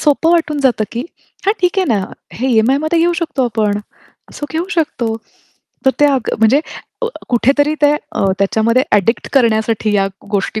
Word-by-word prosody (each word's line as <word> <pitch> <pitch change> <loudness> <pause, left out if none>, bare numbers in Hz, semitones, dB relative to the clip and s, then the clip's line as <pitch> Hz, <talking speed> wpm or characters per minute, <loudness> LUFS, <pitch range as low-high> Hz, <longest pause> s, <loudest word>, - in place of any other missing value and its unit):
सोपं 300 +2 +2
वाटून 320 -3 +1
जातं, 245 -5 +2
की 235 - -3 0.5
"हां, 405 - +5
ठीक 360 +2 +1
आहे 375 - +3
ना, 195 -2 0 0.3
हे 260 +3 -2
ई-एम-आयमध्ये 270 +8 +2
घेऊ 340 +1 +3
शकतो 285 -5 -1
आपण. 215 -3 0 0.6
सो 295 - -5
घेऊ 325 +3 -2
शकतो." 245 -9 -1 0.7
तर - - +7
त्या 290 -1 +4
अ - - +2 0.2
म्हणजे 225 +6 +4 0.4
अ, 485 - +2 0.2
कुठेतरी 280 +5 +2
त्या 295 0 +4 0.2
अ, - - -1
त्याच्यामध्ये 220 +5 +2
ॲडिक्ट 210 +3 +2
करण्यासाठी 220 -4 +2
या 195 -1 +2 0.2
गोष्टी 205 +1 -1
255 Hz, 165 wpm, -16 LUFS, 220-300 Hz, 0.7 s, तर